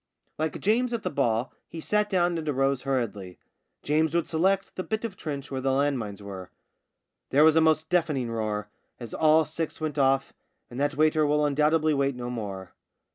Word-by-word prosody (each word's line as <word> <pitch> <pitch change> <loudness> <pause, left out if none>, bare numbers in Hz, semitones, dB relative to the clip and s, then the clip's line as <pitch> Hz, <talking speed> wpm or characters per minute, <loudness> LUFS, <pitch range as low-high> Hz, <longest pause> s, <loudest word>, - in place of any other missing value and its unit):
Like 155 0 -2
James 240 +4 +1
at 230 - -3
the - - -2
ball, 120 -3 0
he 165 - -8
sat 210 +5 0
down 175 -3 +2
and 155 -1 -4
arose 135 -1 +1
hurriedly. 105 -9 -3 0.5
James 155 +2 +1
would 170 - +1
select 190 +4 0
the - - -3
bit 220 +4 -3
of 210 -4 -5
trench 140 -5 -6
where 135 -1 -3
the 135 0 +1
land 140 0 +1
mines 105 -2 -7
were. 95 -2 -8 0.8
There 145 +3 +5
was 160 0 +6
a 160 - +5
most 160 0 +3
deafening 155 -9 0
roar 105 -2 -2 0.3
as 120 -3 -8
all 155 0 +4
six 160 0 -4
went 155 -2 -3
off, 135 0 +2 0.4
and 120 - -6
that 145 0 0
waiter 155 0 +3
will 150 0 +2
undoubtedly 150 +2 +2
wait 140 -1 0
no 125 0 -5
more. 100 -5 -6
145 Hz, 190 wpm, -27 LUFS, 125-160 Hz, 0.8 s, was